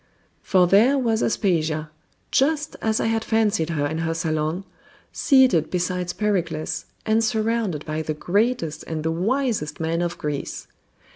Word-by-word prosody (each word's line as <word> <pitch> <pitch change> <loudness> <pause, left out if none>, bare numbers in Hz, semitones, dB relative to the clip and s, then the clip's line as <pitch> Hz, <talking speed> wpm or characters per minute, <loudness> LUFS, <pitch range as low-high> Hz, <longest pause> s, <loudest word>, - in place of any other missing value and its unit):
For 185 -2 +3
there 220 +10 +5
was 230 -4 +1
Aspasia, 155 -7 0 0.4
just 300 +2 +1
as 220 -1 +1
I - - 0
had 225 0 0
fancied 220 -7 +1
her 150 -3 0
in 160 +2 -2
her 165 0 -1
salon, 160 +2 -1 0.5
seated 255 - +4
beside 180 0 -2
Pericles, 175 -7 -1 0.2
and 220 +1 +2
surrounded 220 -7 0
by 155 0 -2
the 155 -1 -3
greatest 200 -1 0
and 160 -1 -3
the 160 - 0
wisest 205 - -1
men 165 +1 -1
of 175 -1 -2
Greece. 150 -2 -4
180 Hz, 145 wpm, -23 LUFS, 160-225 Hz, 0.5 s, there